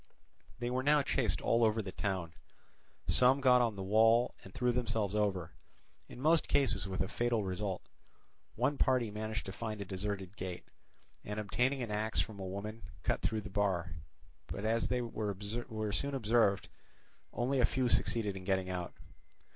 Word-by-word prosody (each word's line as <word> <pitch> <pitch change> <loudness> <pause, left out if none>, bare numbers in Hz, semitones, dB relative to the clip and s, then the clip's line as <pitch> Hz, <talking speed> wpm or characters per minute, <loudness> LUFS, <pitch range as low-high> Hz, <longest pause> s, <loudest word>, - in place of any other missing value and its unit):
They 120 0 -2
were 130 +1 0
now 145 +1 +4
chased 125 -4 0
all 115 0 +3
over 110 0 +3
the 100 -3 -3
town. 90 -4 -2 0.7
Some 130 +2 +5
got 125 -2 +6
on 115 -3 +1
the 95 - -5
wall 115 +4 +4
and - - -11
threw 125 -1 +1
themselves 115 -5 0
over, 95 -6 0 0.6
in - - -10
most 160 +4 +3
cases 135 -9 +3
with 95 -1 -3
a - - +1
fatal 120 0 0
result. 95 0 -3 0.7
One 145 - 0
party 125 -5 +2
managed 110 +1 -4
to 95 - -5
find 110 0 -5
a 100 - -4
deserted 95 0 -4
gate, 95 -4 -6 0.6
and 105 +1 -4
obtaining 125 +6 0
an 115 - -5
axe 110 +1 0
from 105 -2 -2
a 95 - -4
woman, 105 +4 -5 0.2
cut - - 0
through 110 -1 0
the 100 - -9
bar; 95 -5 0 0.5
but 100 - -5
as 115 +1 +2
they 125 -1 0
were 110 -3 -3 0.6
soon 140 +7 -1
observed 110 -4 +2 0.6
only 130 +3 0
a 125 - +5
few 130 -1 +1
succeeded 110 -4 +1
in 95 - -7
getting 95 -1 0
out. 90 -1 -4
110 Hz, 170 wpm, -33 LUFS, 100-120 Hz, 0.7 s, got